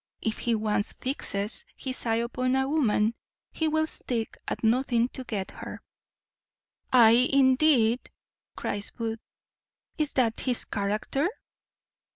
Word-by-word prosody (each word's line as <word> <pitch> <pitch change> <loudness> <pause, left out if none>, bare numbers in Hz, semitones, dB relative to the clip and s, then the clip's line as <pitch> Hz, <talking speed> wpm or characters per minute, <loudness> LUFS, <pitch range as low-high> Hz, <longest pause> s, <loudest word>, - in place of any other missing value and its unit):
If 220 - -2
he 235 -1 +1
once 210 -1 0
fixes 220 - -3
his 255 -2 -4
eye 225 - +2
upon 255 +2 0
a 265 0 +1
woman, 235 -7 +2 0.4
he 320 - -1
will 315 0 +2
stick 235 -7 -4
at - - -4
nothing 240 +1 +2
to 260 - -6
get 205 -6 -4
her." - - -9 1.1
"Ay, 240 0 +7
indeed!" 260 -3 +4 0.5
cries 205 0 -2
Booth. 225 -1 -4 0.8
"Is 300 -2 0
that 230 -4 +1
his 250 -3 0
character?" 215 - -1
240 Hz, 125 wpm, -27 LUFS, 220-265 Hz, 1.1 s, Ay